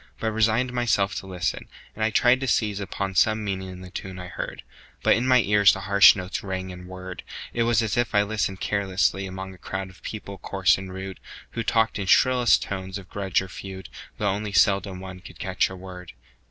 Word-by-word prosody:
but 110 - -1
resigned 110 +3 +2
Myself 115 -5 +1
to 95 - -6
listen, 90 -3 -3 0.3
and 110 - -3
I 110 - +3
tried 120 +3 +4
to 135 - -3
seize 105 -5 +1
Upon 100 -1 -3
some 110 +3 +3
meaning 95 -2 -3
in 90 0 -9
the 90 -1 -10
tune 95 0 -6
I 90 -1 -7
heard. - - -6 0.4
But - - +5
in 120 +3 0
my 125 -1 +6
ears 105 -1 +5
the 95 - -5
harsh 100 +1 +7
notes 95 -1 -4
rang 95 -1 -4
and 90 0 -10
whirred; 95 0 -8 0.3
It 120 - 0
was 115 -1 +3
as 105 -4 -1
if 120 -3 0
I 105 - +5
listened 105 -2 -2
carelessly 95 -2 0
Among 95 0 -7
a 95 - -16
crowd 95 +1 -5
of 95 - -20
people 100 -3 -7
coarse 95 0 +2
and 95 -1 -8
rude, 95 0 -7 0.3
Who 115 - -3
talked 115 -1 +1
in 100 - -3
shrillest 125 +2 +4
tones 95 0 -5
of 95 -3 -11
grudge 95 -2 0
or - - -8
feud, 95 0 -8 0.3
Though 105 - 0
only 105 +1 -3
seldom 95 +1 +2
one 95 -1 -8
could 90 - -13
catch 95 -3 0
a 95 - -8
word. 90 -2 -10
95 Hz, 220 wpm, -25 LUFS, 95-110 Hz, 0.4 s, harsh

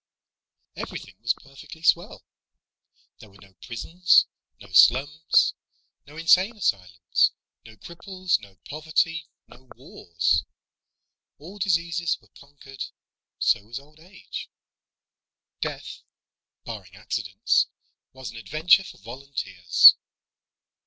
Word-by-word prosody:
Everything 95 - -8
was 120 0 +1
perfectly 140 +4 -14
swell. 170 +1 +1 0.9
There 110 - -14
were 100 - -20
no 95 0 -19
prisons, 170 +9 +2 0.3
no 100 - -15
slums, 145 - +4 0.5
no 150 +2 -14
insane 185 +7 +3
asylums, 90 - +1 0.3
no 110 - -14
cripples, 185 - -3
no 100 -2 -16
poverty, 160 +1 -1 0.2
no 130 +1 -19
wars. 85 -1 -1 0.9
All 180 +8 -12
diseases 170 -3 0
were - - -27
conquered. 140 -1 -11 0.5
So - - +2
was 120 +3 -7
old 150 +3 -14
age. 185 +4 -10 1.1
Death, - - -5 0.6
barring - - -9
accidents, - - 0 0.4
was 130 -4 -9
an 115 - -12
adventure 155 - +3
for 185 - -12
volunteers. 110 -6 +4
140 Hz, 100 wpm, -25 LUFS, 110-170 Hz, 1.1 s, slums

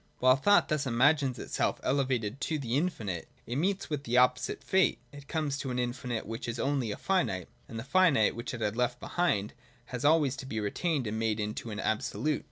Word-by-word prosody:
While 130 0 +5
thought 205 +9 +4
thus 150 -2 0
imagines 135 +2 +3
itself - - -1
elevated 130 -3 0
to 160 - -1
the 125 -4 -2
infinite, 110 - -2 0.2
it 120 - -3
meets 190 +5 0
with 150 -2 -3
the 120 -1 0
opposite 125 0 +2
fate: 190 -2 +3
it 145 0 -12
comes 150 -3 -1
to 135 - -4
an 125 - -2
infinite 125 -1 -2
which 115 +1 -5
is 120 0 -3
only 135 -5 0
a - - -4
finite, 175 - 0 0.2
and 115 - -7
the 110 - -4
finite, 145 - +4
which 120 +1 -5
it 120 - -8
had 105 0 0
left 125 0 0
behind, 105 - 0 0.4
has 125 - -3
always 145 -3 +4
to 130 - -7
be 110 -4 -3
retained 135 - -1
and 110 +1 -2
made 110 -1 0
into 105 +2 -3
an 105 -1 -5
absolute. 140 +7 -1
125 Hz, 205 wpm, -30 LUFS, 115-145 Hz, 0.4 s, While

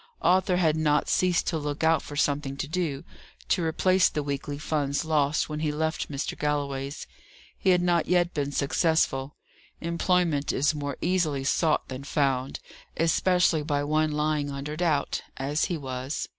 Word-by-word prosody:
Arthur 185 0 +3
had 160 -4 +2
not 155 -2 +2
ceased 180 -1 +2
to 160 - -1
look 145 +1 -4
out 160 -1 +4
for 145 - -9
something 140 -1 0
to 145 - -3
do, 155 -3 -2 0.5
to 185 - +2
replace 185 +3 +3
the 150 - -3
weekly 145 0 -4
funds 145 -1 -1
lost 150 -2 +1
when 150 -1 -4
he 155 -1 0
left 160 +1 -2
Mr. 140 -1 -3
Galloway's. 140 -1 -2 0.5
He 190 - 0
had 180 -1 +4
not 175 -2 +2
yet 175 0 +2
been 145 -1 -2
successful: 140 -1 +1 0.4
employment 170 -3 +1
is 145 +3 +1
more 145 -2 -4
easily 165 -6 +1
sought 155 +3 +1
than 130 +1 -6
found, 135 -2 0 0.4
especially 170 0 +3
by 145 -1 -1
one 155 +1 +1
lying 150 -1 0
under 140 +2 -5
doubt, 155 -4 0 0.2
as 140 +3 0
he 175 - -2
was. 130 0 -4
150 Hz, 160 wpm, -27 LUFS, 140-165 Hz, 0.5 s, out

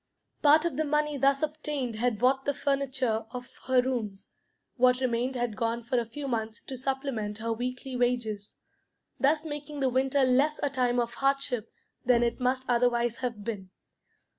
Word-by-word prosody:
Part 305 +2 +6
of 335 -6 -1
the 315 - +2
money 300 0 +1
thus 275 +1 +2
obtained 295 -6 -2
had 240 -1 +1
bought 265 +4 +2
the 285 - 0
furniture 265 -6 0
of 245 0 -7 0.2
her 255 -1 +4
rooms; 220 -7 -3 0.4
what 250 0 +4
remained 255 0 0
had 240 -3 -1
gone 230 0 -1
for 240 +2 +1
a 230 - -3
few 275 +5 -6
months 225 -3 -2
to 265 - -6
supplement 260 -5 -2
her 230 +1 -1
weekly 250 +3 -4
wages, 240 -4 -1 0.6
thus 300 +3 +2
making 295 -1 -5
the 265 -1 +2
winter 265 +2 +2
less 270 +4 +3
a 285 - +1
time 250 -2 +1
of 235 0 -1
hardship 275 -4 0 0.3
than 240 -1 +4
it 235 +1 0
must 255 +1 0
otherwise 240 -1 +2
have 235 -5 -4
been. 200 -4 -5
250 Hz, 170 wpm, -29 LUFS, 235-275 Hz, 0.6 s, Part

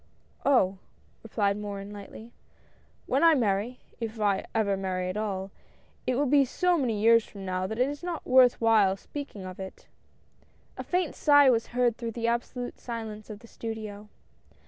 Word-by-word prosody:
" - - -36
Oh! 195 -9 +3 0.2
" - - -35
replied 205 -2 0
Morin, 205 -1 -6
lightly, 210 +3 -10 0.4
" - - -35
when 270 +4 +1
I 330 -1 +7
marry, 225 0 0 0.2
if 225 -1 -5
I 200 -2 +1
ever 205 -3 +2
marry 185 -1 -2
at 185 - -4
all, 195 -3 -3 0.6
it 255 - +2
will 285 +3 +2
be 280 +1 +5
so 355 +7 +1
many 245 -9 0
years 230 +1 +5
from 200 -2 -10
now, 185 0 -1
that 220 - -5
it 250 +2 +3
is 290 +1 -5
not 350 -3 -5
worth 255 -1 +5
while 215 -4 +4
speaking 220 -5 -8
of 185 0 -8
it." 190 0 -8 0.9
A - - -6
faint 360 -3 -1
sjgh 285 -3 +6
was 230 -2 0
heard 240 -2 +1
through 230 -2 -4
the 230 0 -3
absolute 240 +1 -3
silence 220 -3 -6
of 210 0 -8
the 230 - -14
studio. 215 -2 -7
225 Hz, 185 wpm, -28 LUFS, 200-250 Hz, 0.9 s, I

